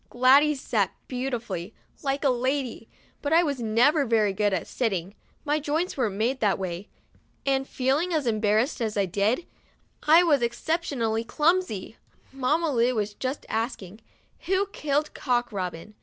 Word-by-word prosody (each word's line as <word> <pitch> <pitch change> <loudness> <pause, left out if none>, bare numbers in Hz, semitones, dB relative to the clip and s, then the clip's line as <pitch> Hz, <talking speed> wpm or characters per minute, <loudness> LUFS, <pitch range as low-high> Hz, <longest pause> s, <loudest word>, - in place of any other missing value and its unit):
Gladys 275 +4 +4
sat 210 -7 0 0.2
beautifully, 240 -7 -4 0.3
like 275 0 -1
a 280 - +4
little 245 -2 0
lady, 260 -3 -2 0.3
but 290 +2 -1
I 335 +2 +6
never 260 +1 +2
was 255 - -6
very 215 -3 +3
good 205 +1 +1
at 185 -3 -1
sitting, 195 -6 -2 0.3
my 295 +1 +1
joints 310 +5 -1
weren't 225 -7 -1
made 240 +6 0
that 205 -3 +2
way, 185 +1 -5 0.6
and, 270 -1 +1
feeling 275 +7 0
as 310 -5 0
embarrassed 220 +4 +1
as 215 -2 -1
I 200 - +3
did, 205 - 0 0.6
I 325 +3 +6
was 295 -6 +3
exceptionally 235 -3 -1
clumsy. 300 - 0 0.4
Mamma 295 +5 +1
Lu 240 +1 +2
was 210 -1 -1
just 260 +6 -4
asking: 220 -3 -4 0.5
"Who 380 +2 +2
killed 295 -2 -1
Cock 245 -2 0
Robin?" 185 0 -5
245 Hz, 155 wpm, -26 LUFS, 215-290 Hz, 0.6 s, I